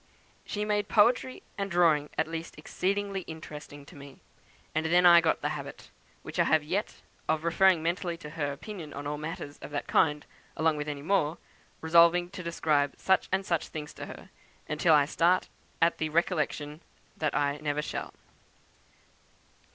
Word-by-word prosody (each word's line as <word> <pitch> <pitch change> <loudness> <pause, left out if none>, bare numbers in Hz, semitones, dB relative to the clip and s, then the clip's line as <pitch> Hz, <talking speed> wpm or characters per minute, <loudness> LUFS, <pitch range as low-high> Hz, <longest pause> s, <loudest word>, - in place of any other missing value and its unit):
She 210 0 -2
made 210 -1 0
poetry 240 +4 +3 0.2
and 200 0 -2
drawing 165 -5 +3
at 160 - +1
least 165 -1 -6
exceedingly 195 +5 -2
interesting 150 -2 -9
to - - -15
me; 140 -1 -12 0.5
and 155 +1 0
then 175 +2 +4
I 170 -1 +9
got 160 - +1
the 150 - +1
habit, 145 -2 -7 0.3
which - - -6
I - - +5
have 155 -1 +3
yet, 195 +8 -3 0.3
of 155 0 +1
referring 170 0 +4
mentally 170 0 -1
to 150 -3 -10
her 150 -3 -2
opinion 155 0 -8
on 140 - -6
all 145 0 -3
matters 150 -2 -6
of 135 - -9
that 145 0 -3
kind, 150 -1 +2 0.3
along 160 -1 +2
with 150 0 -4
many 145 -1 -5
more, 165 -3 +1 0.4
resolving 170 +2 +5
to 195 - -7
describe 155 -4 0
such 190 -1 +2
and 190 +1 0
such 170 -4 -1
things 150 -1 -7
to - - -8
her, - - -11 0.4
until 155 +1 +3
I 145 -1 +5
start 175 +5 +2 0.3
at 170 - +2
the 155 - -1
recollection 155 -2 -1 0.4
that 155 -2 -1
I 145 0 +1
never 150 0 -1
shall." - - -5
160 Hz, 170 wpm, -29 LUFS, 150-175 Hz, 0.5 s, I